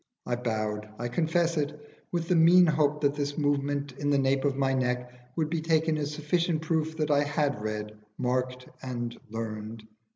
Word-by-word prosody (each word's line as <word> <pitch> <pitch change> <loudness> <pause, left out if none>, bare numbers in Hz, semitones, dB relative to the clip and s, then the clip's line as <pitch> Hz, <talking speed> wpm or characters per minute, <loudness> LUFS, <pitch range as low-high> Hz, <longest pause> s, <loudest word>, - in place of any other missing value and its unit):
I 120 - 0
bowed 110 -3 -2
I 120 +1 -3
confess 165 +4 +1
it 150 0 -1 0.3
with 170 -2 -1
the 180 - +3
mean 170 +2 +7
hope 150 -2 +2
that 140 -1 +3
this 145 0 -3
movement 145 -1 0
in 145 - 0
the 145 - +4
nape 135 0 +2
of 140 -2 +2
my 135 -1 +1
neck 125 -1 -1 0.2
would 160 -2 +1
be 165 0 -1
taken 160 0 +2
as 145 0 -2
sufficient 160 +2 0
proof 160 0 0
that 155 -1 0
I 145 0 +4
had 145 -5 0
read, 105 0 -3 0.2
marked, 125 0 -1
and 120 -2 -4
learned. 110 0 -5
145 Hz, 185 wpm, -28 LUFS, 125-155 Hz, 0.3 s, mean